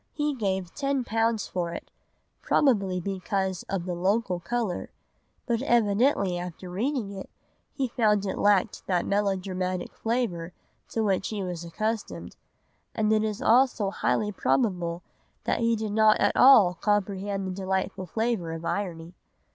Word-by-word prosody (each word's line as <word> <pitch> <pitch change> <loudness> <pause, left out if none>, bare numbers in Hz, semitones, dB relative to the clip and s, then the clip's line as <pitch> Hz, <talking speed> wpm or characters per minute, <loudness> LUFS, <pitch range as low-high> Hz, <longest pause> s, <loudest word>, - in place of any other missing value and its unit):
He 295 -1 0
gave 190 -7 -2
ten 275 -2 -1
pounds 225 -1 0
for 170 -2 -3
it, - - -9 0.5
probably 200 -10 +2
because 190 0 -2
of 190 -3 -2
the 180 - -2
local 185 +1 0
colour, 225 -1 -2 0.6
but 235 -1 0
evidently 215 -5 +2
after 180 +1 -7
reading 230 +2 -1
it 195 -1 -8 0.4
he 265 - -1
found 210 -4 +2
it 190 - -3
lacked 205 0 +2
that 180 -2 +1
melodramatic 185 -2 -1
flavour 210 -8 -2 0.4
to 225 - -1
which 195 -2 +1
he 210 -3 -3
was 175 -2 -4
accustomed; 215 +6 -4 0.6
and 215 -1 +2
it 215 0 +2
is 215 +3 -3
also 240 -5 +3
highly 210 +1 0
probable 180 -6 0 0.4
that - - 0
he 230 0 +2
did 215 -1 -3
not 215 0 +5
at 205 - +2
all 220 -9 +7
comprehend 200 +1 -1
the 190 - -3
delightful 190 0 -2
flavour 220 -5 -1
of 165 0 -6
irony. 170 -4 -3
200 Hz, 145 wpm, -27 LUFS, 185-225 Hz, 0.6 s, all